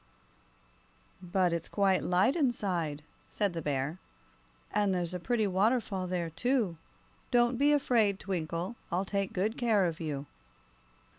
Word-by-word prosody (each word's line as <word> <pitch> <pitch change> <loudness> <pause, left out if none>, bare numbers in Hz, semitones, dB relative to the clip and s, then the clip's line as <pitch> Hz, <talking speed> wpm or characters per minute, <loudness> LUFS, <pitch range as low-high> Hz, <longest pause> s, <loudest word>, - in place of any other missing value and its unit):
"But 180 -1 +1
it's 170 -1 -2
quite 195 -2 +2
light 190 +9 +2
inside," 185 - -1 0.2
said 200 -4 -1
the 165 - -3
bear, 145 +3 -2 0.7
"and 205 -2 +2
there's 175 -1 -2
a 180 - -3
pretty 220 +4 0
waterfall 195 -1 +1
there, 175 -2 -2
too. 220 - 0 0.5
Don't 240 0 +3
be 290 +1 +5
afraid, 230 -9 +2
Twinkle; 175 +3 -3
I'll 180 +3 0
take 195 0 -1
good 210 +5 -1
care 220 -6 +3
of 165 -2 -2
you." 150 -4 -3
190 Hz, 135 wpm, -31 LUFS, 170-220 Hz, 0.7 s, be